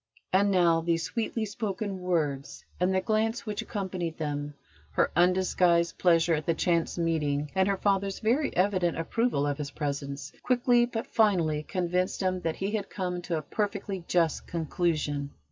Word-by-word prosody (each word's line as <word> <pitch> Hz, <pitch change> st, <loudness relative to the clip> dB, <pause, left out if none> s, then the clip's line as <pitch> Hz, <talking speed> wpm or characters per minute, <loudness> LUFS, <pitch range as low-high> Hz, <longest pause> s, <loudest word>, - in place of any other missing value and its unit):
And 200 Hz, +2 st, +4 dB
now 170 Hz, -4 st, +4 dB
these 165 Hz, 0 st, 0 dB
sweetly 220 Hz, +4 st, -2 dB
spoken 200 Hz, -2 st, -3 dB
words 150 Hz, -6 st, -2 dB
and 180 Hz, +1 st, +2 dB
the 190 Hz, 0 st, +2 dB
glance 220 Hz, +3 st, 0 dB
which 210 Hz, -2 st, -3 dB
accompanied 185 Hz, -5 st, -4 dB
them, 145 Hz, -2 st, -3 dB, 0.4 s
her -, -, +2 dB
undisguised 180 Hz, -1 st, +3 dB
pleasure 170 Hz, -1 st, +4 dB
at 155 Hz, +1 st, -2 dB
the 165 Hz, -, +2 dB
chance 170 Hz, 0 st, +1 dB
meeting, 150 Hz, -3 st, 0 dB
and 190 Hz, 0 st, +2 dB
her 200 Hz, -1 st, +1 dB
father's 195 Hz, 0 st, +1 dB
very 250 Hz, +7 st, +1 dB
evident 185 Hz, -2 st, +2 dB
approval 165 Hz, -2 st, 0 dB
of 145 Hz, 0 st, -1 dB
his 145 Hz, -1 st, -3 dB
presence, 140 Hz, -1 st, -4 dB
quickly 245 Hz, -1 st, +3 dB
but 235 Hz, 0 st, -4 dB
finally 175 Hz, -9 st, +2 dB
convinced 180 Hz, +3 st, -1 dB
him 185 Hz, -1 st, 0 dB
that 165 Hz, -2 st, -1 dB
he 195 Hz, +2 st, -2 dB
had 210 Hz, -2 st, -2 dB
come 180 Hz, -2 st, -3 dB
to 175 Hz, -2 st, -2 dB
a 155 Hz, -, -4 dB
perfectly 200 Hz, +1 st, -3 dB
just 165 Hz, -3 st, +1 dB
conclusion. 155 Hz, -3 st, -1 dB
180 Hz, 160 wpm, -28 LUFS, 160-200 Hz, 0.4 s, And